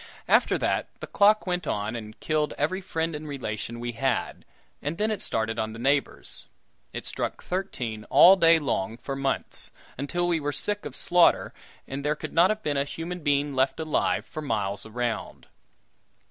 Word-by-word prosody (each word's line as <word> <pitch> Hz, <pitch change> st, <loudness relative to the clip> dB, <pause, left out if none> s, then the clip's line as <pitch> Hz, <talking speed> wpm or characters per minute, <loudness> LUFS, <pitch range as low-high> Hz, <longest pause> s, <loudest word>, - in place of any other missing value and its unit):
After -, -, +4 dB
that -, -, 0 dB
the -, -, -5 dB
clock 210 Hz, +1 st, +4 dB
went 180 Hz, -3 st, -2 dB
on 105 Hz, +3 st, -2 dB
and 110 Hz, -2 st, -8 dB
killed 155 Hz, -1 st, 0 dB
every 185 Hz, +7 st, 0 dB
friend 165 Hz, -3 st, -2 dB
and 150 Hz, +1 st, -6 dB
relation 120 Hz, -4 st, -4 dB
we 120 Hz, 0 st, -3 dB
had, 125 Hz, +2 st, -2 dB, 0.4 s
and 150 Hz, +4 st, -3 dB
then 215 Hz, +3 st, +1 dB
it 215 Hz, -, -3 dB
started 115 Hz, 0 st, -1 dB
on 110 Hz, 0 st, -2 dB
the -, -, -8 dB
neighbors. 140 Hz, +4 st, -1 dB, 0.4 s
It -, -, -6 dB
struck -, -, -3 dB
thirteen 120 Hz, -, -3 dB
all 175 Hz, +7 st, +8 dB
day 165 Hz, -3 st, +6 dB
long 115 Hz, -7 st, -2 dB
for 135 Hz, +2 st, -5 dB
months, 135 Hz, 0 st, -2 dB, 0.3 s
until 175 Hz, +6 st, -1 dB
we 170 Hz, -2 st, +2 dB
were 145 Hz, -1 st, -2 dB
sick 205 Hz, +5 st, -2 dB
of -, -, -6 dB
slaughter, 175 Hz, -1 st, +3 dB, 0.3 s
and 135 Hz, +1 st, -5 dB
there 150 Hz, +1 st, +1 dB
could -, -, -7 dB
not 175 Hz, +3 st, +5 dB
have 215 Hz, 0 st, -1 dB
been 145 Hz, -1 st, 0 dB
a 140 Hz, -, +2 dB
human 165 Hz, +5 st, -5 dB
being 145 Hz, -2 st, +1 dB
left 130 Hz, +3 st, +1 dB
alive 155 Hz, -1 st, 0 dB
for 155 Hz, -, -7 dB
miles 105 Hz, -6 st, -2 dB
around. 120 Hz, +1 st, -3 dB
145 Hz, 180 wpm, -26 LUFS, 120-170 Hz, 0.4 s, all